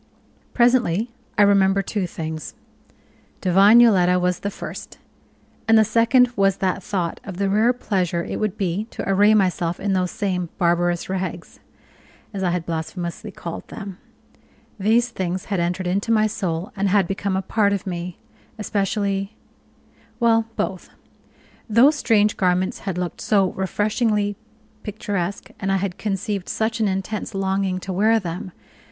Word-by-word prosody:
Presently 240 Hz, -3 st, +2 dB, 0.3 s
I 210 Hz, -, +6 dB
remembered 195 Hz, -1 st, +3 dB
two 200 Hz, -3 st, -2 dB
things 160 Hz, -2 st, -6 dB, 0.8 s
divine 195 Hz, +5 st, +6 dB
Yoletta 180 Hz, -6 st, +5 dB
was 180 Hz, 0 st, 0 dB
the 200 Hz, -, -3 dB
first; -, -, -8 dB, 0.7 s
and 225 Hz, 0 st, +6 dB
the 220 Hz, -, +5 dB
second 235 Hz, +3 st, +4 dB
was 195 Hz, -1 st, +2 dB
that 190 Hz, 0 st, -1 dB
thought 180 Hz, -3 st, -3 dB
of 190 Hz, -3 st, -8 dB
the 200 Hz, 0 st, 0 dB
rare 220 Hz, +4 st, +4 dB
pleasure 185 Hz, -8 st, -1 dB
it -, -, -4 dB
would 215 Hz, -1 st, -2 dB
be 195 Hz, +1 st, -1 dB
to 230 Hz, -, -7 dB
array 205 Hz, +2 st, +5 dB
myself 180 Hz, -4 st, +1 dB
in 200 Hz, 0 st, -1 dB
those 185 Hz, -1 st, +1 dB
same 185 Hz, -5 st, -2 dB
"barbarous 175 Hz, -1 st, +1 dB
rags," 185 Hz, -2 st, -5 dB, 0.7 s
as 195 Hz, -, -4 dB
I 185 Hz, -, +1 dB
had 175 Hz, -1 st, -2 dB
blasphemously 170 Hz, +5 st, -4 dB
called 170 Hz, -3 st, -7 dB
them. 200 Hz, -3 st, -8 dB, 0.8 s
These 230 Hz, +5 st, +3 dB
things 185 Hz, -4 st, -3 dB
had 190 Hz, -, +1 dB
entered 175 Hz, +2 st, -1 dB
into 195 Hz, +5 st, 0 dB
my 215 Hz, -1 st, +4 dB
soul, 180 Hz, -3 st, -3 dB
and 200 Hz, 0 st, 0 dB
had 195 Hz, -2 st, +3 dB
become 195 Hz, 0 st, -1 dB
a 190 Hz, -, -2 dB
part 205 Hz, -1 st, +1 dB
of 200 Hz, -1 st, -2 dB
me 175 Hz, -1 st, -5 dB, 0.4 s
especially 200 Hz, -1 st, -1 dB, 0.8 s
well, 225 Hz, -2 st, +3 dB
both. 190 Hz, -3 st, -3 dB, 0.8 s
Those 250 Hz, +8 st, +5 dB
strange 215 Hz, -6 st, +2 dB
garments 185 Hz, 0 st, +1 dB
had 180 Hz, -, -3 dB
looked 180 Hz, -1 st, -4 dB
so 195 Hz, -3 st, +2 dB
refreshingly 205 Hz, +2 st, 0 dB, 0.5 s
picturesque, 200 Hz, -3 st, -4 dB
and 195 Hz, 0 st, -1 dB
I 195 Hz, -, +3 dB
had 190 Hz, -2 st, -3 dB
conceived 200 Hz, -1 st, -3 dB
such 225 Hz, +1 st, -1 dB
an 220 Hz, -, +2 dB
intense 195 Hz, +2 st, -3 dB
longing 190 Hz, -1 st, 0 dB
to 190 Hz, -, -5 dB
wear 220 Hz, +4 st, +3 dB
them! 180 Hz, 0 st, -6 dB
195 Hz, 150 wpm, -22 LUFS, 180-215 Hz, 0.8 s, I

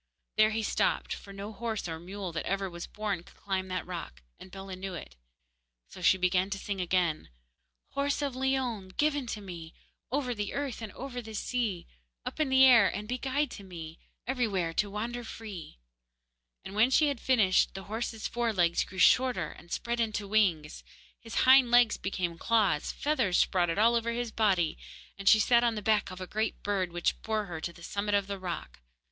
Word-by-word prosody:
There 215 Hz, 0 st, +5 dB
he 220 Hz, 0 st, -1 dB
stopped, -, -, 0 dB
for 200 Hz, -, -9 dB
no 200 Hz, +2 st, -7 dB
horse 220 Hz, -1 st, -3 dB
or 160 Hz, -1 st, -5 dB
mule 190 Hz, +1 st, -6 dB
that 165 Hz, -, -4 dB
ever 195 Hz, 0 st, 0 dB
was 170 Hz, 0 st, -7 dB
born 210 Hz, -4 st, -3 dB
could -, -, -19 dB
climb 190 Hz, -1 st, -3 dB
that 185 Hz, 0 st, -3 dB
rock, 170 Hz, -, -7 dB, 0.2 s
and -, -, -11 dB
Bellah 195 Hz, 0 st, -7 dB
knew 190 Hz, 0 st, -5 dB
it, 65 Hz, -, -9 dB, 0.7 s
so -, -, -11 dB
she 190 Hz, -, +5 dB
began 185 Hz, +1 st, +2 dB
to 195 Hz, -, -3 dB
sing 195 Hz, -1 st, -3 dB
again: 175 Hz, -3 st, 0 dB, 0.6 s
Horse 280 Hz, +1 st, -1 dB
of 275 Hz, -3 st, -2 dB
Leon, 255 Hz, -7 st, -1 dB
given 290 Hz, -3 st, +1 dB
to 215 Hz, -2 st, -4 dB
me, 170 Hz, -4 st, -9 dB, 0.4 s
Over 260 Hz, -2 st, 0 dB
the 205 Hz, -3 st, -4 dB
earth 275 Hz, -5 st, -3 dB
and 220 Hz, -2 st, -6 dB
over 250 Hz, -1 st, -6 dB
the 220 Hz, -1 st, -9 dB
sea, 215 Hz, -6 st, -2 dB, 0.4 s
Up -, -, -5 dB
in 305 Hz, -3 st, +2 dB
the 265 Hz, 0 st, +7 dB
air 235 Hz, -6 st, +7 dB
be 250 Hz, +3 st, -3 dB
guide 280 Hz, +3 st, 0 dB
to 200 Hz, -, -9 dB
me, 165 Hz, -3 st, -9 dB, 0.3 s
Everywhere 210 Hz, -10 st, 0 dB
to 205 Hz, +4 st, 0 dB
wander 235 Hz, +4 st, -4 dB
free, 210 Hz, -, -8 dB, 0.9 s
and 190 Hz, -, -7 dB
when 220 Hz, +4 st, +4 dB
she 300 Hz, +4 st, +4 dB
had 280 Hz, -4 st, -3 dB
finished, 215 Hz, -10 st, +3 dB
the 190 Hz, -, -6 dB
horse's 225 Hz, +1 st, -3 dB
fore 235 Hz, -1 st, 0 dB
legs 170 Hz, -3 st, +2 dB
grew 190 Hz, -, -11 dB
shorter 185 Hz, -1 st, +4 dB
and 170 Hz, -, -15 dB
spread 235 Hz, 0 st, -2 dB
into 215 Hz, -3 st, -1 dB
wings, 180 Hz, -8 st, +1 dB, 0.4 s
his 225 Hz, 0 st, -9 dB
hind 260 Hz, -1 st, +7 dB
legs 240 Hz, -1 st, +5 dB
became 175 Hz, -3 st, -3 dB
claws, 215 Hz, -9 st, +2 dB
feathers 260 Hz, -12 st, +1 dB
sprouted 175 Hz, -2 st, +2 dB
all 225 Hz, +3 st, +5 dB
over 235 Hz, 0 st, 0 dB
his 240 Hz, -1 st, -3 dB
body, 190 Hz, -8 st, +1 dB, 0.4 s
and 195 Hz, -, +4 dB
she 220 Hz, -, +8 dB
sat 235 Hz, +3 st, +4 dB
on 235 Hz, -1 st, +2 dB
the -, -, -2 dB
back 215 Hz, -1 st, +2 dB
of 185 Hz, 0 st, -8 dB
a 185 Hz, -, -4 dB
great 215 Hz, +4 st, -2 dB
bird, 195 Hz, -3 st, 0 dB
which 175 Hz, 0 st, -1 dB
bore 220 Hz, -1 st, -1 dB
her 165 Hz, -4 st, -6 dB
to 170 Hz, -, -3 dB
the 170 Hz, 0 st, -15 dB
summit 205 Hz, +3 st, -1 dB
of 200 Hz, -1 st, +2 dB
the 200 Hz, 0 st, -5 dB
rock. 170 Hz, -, -6 dB
205 Hz, 200 wpm, -30 LUFS, 185-235 Hz, 0.9 s, she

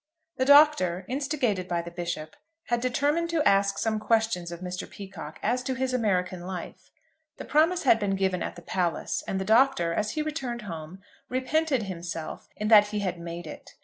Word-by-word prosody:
THE 260 Hz, -, +1 dB
Doctor, 280 Hz, -, +5 dB
instigated 255 Hz, -, -1 dB
by 170 Hz, -1 st, -1 dB
the 170 Hz, -, -8 dB
Bishop, 170 Hz, -3 st, -5 dB, 0.3 s
had 240 Hz, -1 st, +1 dB
determined 290 Hz, +7 st, +1 dB
to 330 Hz, -3 st, +1 dB
ask 200 Hz, 0 st, +3 dB
some 220 Hz, -1 st, 0 dB
questions 220 Hz, -6 st, 0 dB
of 170 Hz, 0 st, -8 dB
Mr. 180 Hz, 0 st, -5 dB
Peacocke 170 Hz, -6 st, -9 dB
as 245 Hz, +4 st, +1 dB
to 260 Hz, +1 st, -3 dB
his 260 Hz, 0 st, -1 dB
American 185 Hz, -6 st, 0 dB
life. 180 Hz, -1 st, -7 dB, 0.5 s
The -, -, -7 dB
promise 325 Hz, +4 st, +3 dB
had 235 Hz, -4 st, +5 dB
been 200 Hz, -2 st, 0 dB
given 190 Hz, -2 st, 0 dB
at -, -, -4 dB
the 175 Hz, -, -12 dB
Palace, 175 Hz, -3 st, -1 dB
and 190 Hz, -, -1 dB
the 190 Hz, -, -3 dB
Doctor, 220 Hz, -6 st, +3 dB
as 210 Hz, +4 st, -1 dB
he 305 Hz, -, -1 dB
returned 265 Hz, -7 st, -4 dB
home, 170 Hz, 0 st, -8 dB, 0.3 s
repented 265 Hz, 0 st, 0 dB
himself 170 Hz, -4 st, -6 dB
in 210 Hz, -, -3 dB
that 210 Hz, -2 st, +8 dB
he 210 Hz, 0 st, -3 dB
had 185 Hz, -3 st, -2 dB
made 170 Hz, 0 st, -6 dB
it. 155 Hz, -, -11 dB
205 Hz, 185 wpm, -27 LUFS, 180-255 Hz, 0.5 s, that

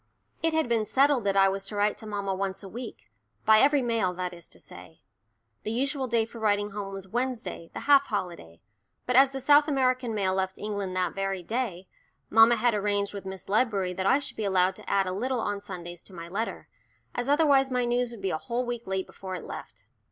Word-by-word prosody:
It 325 Hz, 0 st, +1 dB
had 320 Hz, -4 st, +1 dB
been 230 Hz, -2 st, +2 dB
settled 270 Hz, 0 st, +2 dB
that 195 Hz, 0 st, +1 dB
I 195 Hz, 0 st, +6 dB
was 195 Hz, 0 st, -2 dB
to 210 Hz, -, -6 dB
write 205 Hz, +1 st, +2 dB
to 220 Hz, -, -8 dB
mamma 200 Hz, -2 st, -2 dB
once 190 Hz, +1 st, -3 dB
a -, -, -7 dB
week 240 Hz, +6 st, -9 dB, 0.3 s
by 220 Hz, 0 st, +7 dB
every 280 Hz, +1 st, +4 dB
mail, 225 Hz, -7 st, 0 dB
that 180 Hz, 0 st, -3 dB
is 170 Hz, -1 st, -11 dB
to -, -, -13 dB
say. 160 Hz, -, -12 dB, 0.6 s
The -, -, -4 dB
usual 270 Hz, +3 st, -1 dB
day 230 Hz, -1 st, +2 dB
for 230 Hz, +1 st, -11 dB
writing 205 Hz, -1 st, +1 dB
home 200 Hz, -1 st, -5 dB
was 195 Hz, -1 st, -7 dB
Wednesday, 240 Hz, -6 st, -3 dB
the -, -, -4 dB
half 280 Hz, -1 st, +5 dB
holiday, 170 Hz, -, -5 dB, 0.4 s
but 250 Hz, -, 0 dB
as 270 Hz, +1 st, +7 dB
the 270 Hz, 0 st, -5 dB
South 290 Hz, +3 st, +5 dB
American 255 Hz, -5 st, +1 dB
mail 190 Hz, -2 st, +1 dB
left 190 Hz, 0 st, -1 dB
England 200 Hz, -3 st, -4 dB
that 185 Hz, -1 st, 0 dB
very 195 Hz, -2 st, -2 dB
day, 220 Hz, -4 st, -3 dB, 0.4 s
mamma 225 Hz, +1 st, +7 dB
had 240 Hz, 0 st, +2 dB
arranged 205 Hz, -1 st, 0 dB
with 200 Hz, -1 st, -7 dB
Miss 190 Hz, 0 st, -7 dB
Ledbury 200 Hz, -4 st, +1 dB
that 190 Hz, +2 st, -2 dB
I 265 Hz, -, +5 dB
should 285 Hz, -1 st, -6 dB
be 220 Hz, -, -2 dB
allowed 190 Hz, -1 st, +2 dB
to -, -, -10 dB
add 195 Hz, -1 st, +2 dB
a 185 Hz, -, -2 dB
little 250 Hz, +6 st, -1 dB
on 205 Hz, -2 st, -2 dB
Sundays 175 Hz, -4 st, -8 dB
to 195 Hz, -, -12 dB
my 170 Hz, 0 st, -7 dB
letter, 210 Hz, +6 st, -4 dB, 0.5 s
as 245 Hz, +2 st, -3 dB
otherwise 285 Hz, -3 st, +4 dB
my 250 Hz, -1 st, 0 dB
news 245 Hz, 0 st, +1 dB
would 230 Hz, -4 st, -10 dB
be 190 Hz, -, 0 dB
a 155 Hz, -, -2 dB
whole 250 Hz, 0 st, -2 dB
week 240 Hz, -2 st, -5 dB
late 190 Hz, 0 st, -1 dB
before 190 Hz, -1 st, -7 dB
it 175 Hz, -, -7 dB
left. -, -, -9 dB
210 Hz, 225 wpm, -27 LUFS, 190-250 Hz, 0.6 s, by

